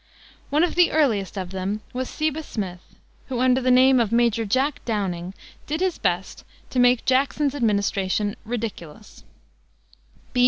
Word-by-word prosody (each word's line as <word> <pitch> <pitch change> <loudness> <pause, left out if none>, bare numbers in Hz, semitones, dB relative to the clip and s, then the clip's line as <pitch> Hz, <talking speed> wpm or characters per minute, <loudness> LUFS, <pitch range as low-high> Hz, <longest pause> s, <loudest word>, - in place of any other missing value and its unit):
One 300 +3 +2
of 350 - +1
the 355 -1 +4
earliest 225 -11 +1
of 185 -2 -4
them 195 +3 -3
was 255 0 -3
Seba 310 0 -2
Smith, 190 - -5 0.5
who, 255 -3 -3
under 255 +1 +3
the 255 - +1
name 255 +1 +6
of 225 -3 +1
Major 235 -1 +2
Jack 270 +7 0
Downing, 190 -5 -3 0.3
did 310 +2 -2
his 370 -2 -1
best 180 -1 -2 0.3
to 255 - 0
make 245 -1 +4
Jackson's 275 +2 +1
administration 205 -4 0
ridiculous. 215 -9 -7
235 Hz, 145 wpm, -23 LUFS, 200-270 Hz, 0.5 s, name